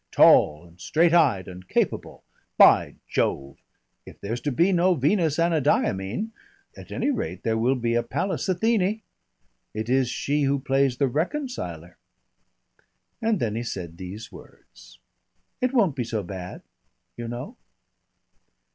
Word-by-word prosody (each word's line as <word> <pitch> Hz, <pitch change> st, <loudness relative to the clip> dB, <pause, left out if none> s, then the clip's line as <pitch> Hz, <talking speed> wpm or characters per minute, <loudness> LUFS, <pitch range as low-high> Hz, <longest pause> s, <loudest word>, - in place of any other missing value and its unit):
"Tall 75 Hz, +3 st, +5 dB
and 85 Hz, +1 st, -19 dB
straight 165 Hz, +1 st, +2 dB
eyed 135 Hz, -, +3 dB
and 90 Hz, 0 st, -10 dB
capable. -, -, -2 dB, 0.3 s
By -, -, +6 dB
Jove! 70 Hz, 0 st, -1 dB, 0.5 s
if -, -, -14 dB
there's 115 Hz, +4 st, -4 dB
to 145 Hz, -, -1 dB
be 170 Hz, +10 st, +3 dB
no 180 Hz, 0 st, +3 dB
Venus 155 Hz, +2 st, +1 dB
Anadyomene, 155 Hz, -, 0 dB, 0.4 s
at -, -, -12 dB
any 290 Hz, -, 0 dB
rate 90 Hz, -, -4 dB
there 115 Hz, -1 st, 0 dB
will 120 Hz, +4 st, +2 dB
be 120 Hz, -2 st, -1 dB
a 120 Hz, -, +2 dB
Pallas 145 Hz, +10 st, -3 dB
Athene. 210 Hz, +2 st, +1 dB, 0.7 s
It 110 Hz, +2 st, -4 dB
is 130 Hz, -1 st, +2 dB
she 145 Hz, +4 st, -1 dB
who 140 Hz, 0 st, +2 dB
plays 135 Hz, -1 st, +1 dB
the 140 Hz, -, +2 dB
reconciler." 140 Hz, -, -4 dB, 1.2 s
And 225 Hz, -3 st, +1 dB
then 110 Hz, -3 st, -1 dB
he 115 Hz, -, -2 dB
said 90 Hz, -8 st, -6 dB
these 95 Hz, +4 st, -8 dB
words: -, -, -16 dB, 0.6 s
"It 255 Hz, 0 st, +1 dB
won't 205 Hz, -, +2 dB
be 125 Hz, -, -1 dB
so 110 Hz, -3 st, -3 dB
bad, 90 Hz, -1 st, -8 dB, 0.5 s
you 120 Hz, -1 st, -6 dB
know." 125 Hz, -, -6 dB
130 Hz, 140 wpm, -25 LUFS, 105-170 Hz, 1.2 s, By